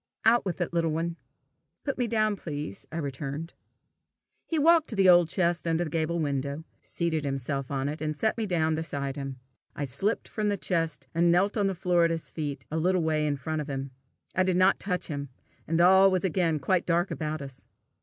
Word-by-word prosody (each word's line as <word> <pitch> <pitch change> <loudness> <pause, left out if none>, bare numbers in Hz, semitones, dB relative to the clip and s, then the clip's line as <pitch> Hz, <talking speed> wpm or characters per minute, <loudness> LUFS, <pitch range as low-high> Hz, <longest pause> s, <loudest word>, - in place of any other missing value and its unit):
"Out 230 0 +5
with 185 -2 -3
it, 175 - -2
little 165 -1 +1
one." 165 +2 -2 0.7
"Put 275 -2 -3
me 245 - +1
down, 215 -2 +1
please," 145 - -6
I 160 - -4
returned. 145 +2 -4 0.9
He 325 - -1
walked 325 +1 +5
to 220 - -2
the 195 -2 +4
old 175 -2 +6
chest 170 -1 0
under 165 +1 +1
the 155 - -5
gable 165 +1 0
window, 140 0 -2 0.2
seated 165 -3 -2
himself 135 -1 -2
on 135 -1 -1
it, 150 +1 -4
and 155 -1 -2
set 220 +5 +1
me 225 -2 -2
down 160 -4 +1
beside 140 -4 -3
him. 135 -2 -6 0.4
I 145 - -3
slipped 145 - -1
from 210 -1 -1
the 200 - 0
chest, 165 -3 -1
and 170 +1 +3
knelt 190 +4 +3
on 205 -3 +2
the 195 - -1
floor 175 -1 +2
at 170 - +4
his 165 -1 -3
feet, 145 -4 -4
a 160 - -1
little 180 +1 +2
way 155 -1 +1
in 145 -1 0
front 155 +3 -3
of 150 - -7
him. 135 -1 -4 0.4
I 185 - +3
did 185 -1 +2
not 185 +1 +4
touch 180 -2 -2
him, 140 -3 -5 0.4
and 165 +1 +1
all 190 +2 +7
was 185 -2 0
again 170 -3 +1
quite 175 +5 0
dark 175 +2 +1
about 155 0 -3
us. 135 -2 -10
165 Hz, 215 wpm, -28 LUFS, 145-185 Hz, 0.9 s, all